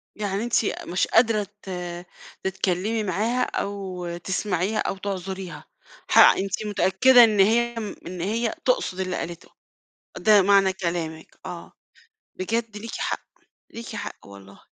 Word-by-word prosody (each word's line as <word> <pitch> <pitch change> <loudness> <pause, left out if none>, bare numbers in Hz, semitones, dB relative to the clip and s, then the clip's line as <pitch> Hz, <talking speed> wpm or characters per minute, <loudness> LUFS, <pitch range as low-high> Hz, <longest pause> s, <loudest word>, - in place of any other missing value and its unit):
يعني 205 0 -2
أنتِ 240 0 -1 0.3
مش 180 - 0
قادرة 225 -3 +3
ت 190 - -11 0.7
تتكلمي 190 +3 -1
معاها 220 +7 0
أو 185 -5 -4
تسمعيها 190 +2 -1
أو 195 - -1
تعذُريها، 190 -1 -5 0.4
حق - - +7
أنتِ 195 +2 -2
متأكدة 235 +5 +5
إن 215 -3 +3
هي 235 +4 +3 0.3
إن 180 -1 -6
هي 225 - -1
تقصد 465 - +1
اللي 185 -1 -2
قالته، 170 0 -6 0.7
ده 210 -2 +5
معنى 195 -1 +4
كلامِك 170 -3 -4
آه، - - -8 0.6
بجد 220 +3 -2
ليكِ 225 +2 -7
حق، - - -3 0.5
ليكِ 230 -1 -8
حق 205 - -7
والله. 100 0 -14
195 Hz, 125 wpm, -24 LUFS, 185-220 Hz, 0.7 s, حق